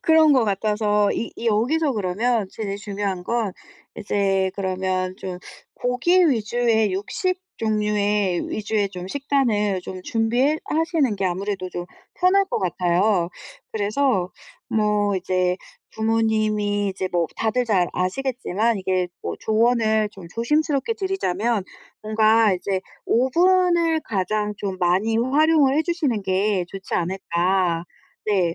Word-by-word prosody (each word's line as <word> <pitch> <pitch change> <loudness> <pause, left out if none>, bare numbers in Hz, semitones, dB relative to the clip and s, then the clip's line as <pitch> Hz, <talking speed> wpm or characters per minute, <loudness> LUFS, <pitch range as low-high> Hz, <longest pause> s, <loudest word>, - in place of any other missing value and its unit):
그런 320 -2 +5
것 255 -4 +4
같아서 210 0 +1
이 230 - -3
이 235 - -5
여기서 265 +8 +2
그러면 215 +2 0
제일 200 -2 -4
중요한 200 -3 -4
건 230 -5 -1 0.4
이제 195 -2 0
그러면 185 -1 -2
좀 180 -1 -6 0.4
고기 335 +9 +2
위주의 225 -2 +1
육식 365 - -2 0.2
종류의 210 -3 0
위주의 210 -1 -1
좀 180 -1 -7
식단을 225 -7 0
좀 185 -1 -7
준비해 240 +8 +1
하시는 315 - +1
게 195 - -2
아무래도 185 +1 -2
좀 175 - -5 0.4
편할 390 +2 +4
것 - - -2
같아요. 180 +1 +1 0.4
그래서 210 -2 0 0.4
뭐 210 -2 +1
이제 185 0 0 0.4
부모님이 215 -2 +1
이제 190 -1 -3
뭐 170 -2 +1
다들 240 +3 0
잘 195 -6 +2
아시겠지만 225 +1 -1
이게 185 -1 0
뭐 - - -4
조언을 220 -1 +2
좀 190 -4 -12
조심스럽게 295 - 0
드리자면 235 - -1 0.4
뭔가 220 0 +4
이제 190 +1 -2 0.2
오븐을 340 +5 +3
가장 210 +1 -1
좀 195 -2 -4
많이 190 +6 +2
활용을 285 +2 +3
해 315 - +3
주시는 300 - -1
게 190 0 +1
좋지 195 -1 -6
않을까. 175 -1 0 0.4
네. 180 -5 +1
210 Hz, 265 characters per minute, -23 LUFS, 190-245 Hz, 0.4 s, 그런